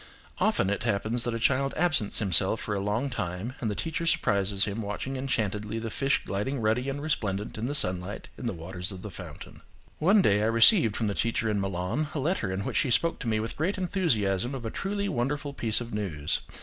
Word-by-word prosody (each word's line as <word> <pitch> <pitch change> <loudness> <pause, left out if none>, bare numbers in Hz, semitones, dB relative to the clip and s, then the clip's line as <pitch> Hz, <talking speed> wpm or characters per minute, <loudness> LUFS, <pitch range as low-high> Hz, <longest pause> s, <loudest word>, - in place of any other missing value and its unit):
Often 95 - +2
it 100 - -1
happens 110 +2 0
that 120 - -1
a - - -2
child 135 +3 +1
absents 155 -11 +2
himself 95 +1 +3
for 105 - -3
a 100 - -1
long 105 +8 -1
time 90 +5 -3
and 115 - 0
the 105 - -2
teacher 165 - -2
surprises 100 -8 +2
him 105 +2 -3
watching 105 +6 -4
enchantedly 110 -5 -2
the 115 -1 -4
fish 135 +3 +1
gliding 115 +8 -2
ruddy 115 +4 +1
and 145 +1 -4
resplendent 105 -9 -2
in 110 +2 -3
the 145 - -2
sunlight 90 -3 0
in 125 - -5
the 115 - -1
waters 90 +3 -4
of 95 -1 -9
the 105 - -6
fountain. 85 -6 -10 0.4
One 195 +5 +5
day 100 +1 +3
I 110 - +2
received 115 - +6
from 115 - 0
the 100 - 0
teacher 115 0 0
in 100 -1 0
Milan 95 - -1
a - - 0
letter 135 - 0
in 95 +1 -2
which - - -1
she 135 - +2
spoke 165 +7 +2
to 125 - -5
me 110 -1 +1
with 110 +1 -4
great 180 +7 -1
enthusiasm 130 - 0
of 125 -3 -6
a 110 - -3
truly 200 +1 -2
wonderful 145 0 -2
piece 115 -5 +2
of 120 -2 -7
news. 80 -9 -1
110 Hz, 220 wpm, -28 LUFS, 100-135 Hz, 0.4 s, received